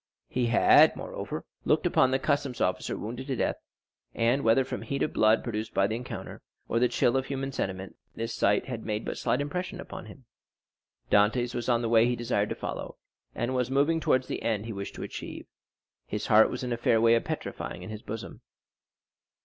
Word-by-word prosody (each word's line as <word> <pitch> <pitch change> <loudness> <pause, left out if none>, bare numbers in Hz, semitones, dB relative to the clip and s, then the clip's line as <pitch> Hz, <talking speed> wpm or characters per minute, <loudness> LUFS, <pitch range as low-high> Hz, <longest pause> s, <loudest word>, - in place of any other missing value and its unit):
He 125 -1 0
had, 115 - +6
moreover, - - -6 0.2
looked - - +2
upon 130 - +4
the 130 - +2
customs 140 -2 -1
officer 90 0 0
wounded 120 +5 -6
to 135 - -1
death, - - 0 0.6
and, 120 +4 +2
whether 115 +4 +4
from - - -5
heat 140 -1 -2
of - - -2
blood 110 +1 +4
produced 110 -2 -4
by 95 - +4
the 110 - -1
encounter, 120 +2 -7 0.3
or 115 - +1
the 125 - +4
chill 120 +1 +2
of 135 0 0
human 135 0 -3
sentiment, 95 -5 -4 0.2
this 115 0 -3
sight 105 +1 +2
had 120 -4 -5
made 105 0 -3
but - - -4
slight 125 - +1
impression 180 +6 -4
upon - - -8
him. 130 - -13 0.9
Dantès 115 +4 +3
was 120 0 -3
on 120 -1 +2
the - - 0
way 115 0 +5
he 125 - +1
desired 115 -4 0
to - - -2
follow, - - -6 0.4
and 120 +2 -1
was 125 -1 0
moving 145 +5 +2
towards 130 -4 +2
the - - -4
end 110 -2 -1
he 115 - -5
wished 100 0 -6
to - - -6
achieve; - - -7 0.6
his 105 - -3
heart 110 0 +6
was 125 - -4
in 125 -1 -1
a - - -2
fair 120 -2 +3
way 115 +1 +5
of 115 - +3
petrifying - - -5
in - - -7
his 110 -1 -7
bosom. 110 +1 -7
120 Hz, 205 wpm, -28 LUFS, 110-130 Hz, 0.9 s, had